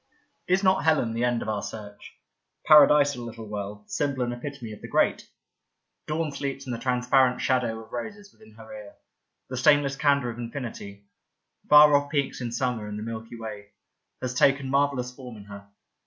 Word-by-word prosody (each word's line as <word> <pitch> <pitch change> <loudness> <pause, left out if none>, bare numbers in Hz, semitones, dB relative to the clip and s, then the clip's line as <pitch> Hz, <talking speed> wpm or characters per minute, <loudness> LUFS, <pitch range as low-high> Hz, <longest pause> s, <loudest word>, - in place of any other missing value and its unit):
" - - -47
Is 190 +2 +2
not 190 0 +3
Helen 155 -8 +2
the 115 +1 -2
end 120 -1 0
of - - -9
our 105 -2 -2
search 105 -1 -9 0.3
— - - -52
paradisal 145 -3 +6
little 115 -1 -8
World, 105 0 -7
symbol 140 -3 -1
and 120 0 -2
epitome 120 -2 -7
of 105 - -11
the - - -8
Great? - - 0 0.8
Dawn 155 0 -2
sleeps 140 -1 -5
in 130 - -5
the 115 - -4
transparent 125 0 +2
shadow 120 -4 0
of 110 - -19
roses 205 - -7
within 110 0 -19
her 110 0 -12
ear. 105 -1 -10 0.6
The 130 - -3
stainless 140 +2 +3
candour 140 -3 +1
of 115 - -10
infinity 115 -5 -7 0.3
— - - -39
far 150 0 +8
off 145 0 +1
peaks 140 -3 -2
in 120 -1 -4
summer 120 -3 -2
and 105 0 -6
the 105 - -5
Milky 115 +1 -7
Way 105 -3 -9 0.2
— - - -52
^has 125 0 -3
taken 135 0 +2
marvellous 135 -3 0
form 125 -4 -10
in 100 - -11
her. 100 0 -12
125 Hz, 195 wpm, -26 LUFS, 110-140 Hz, 0.8 s, far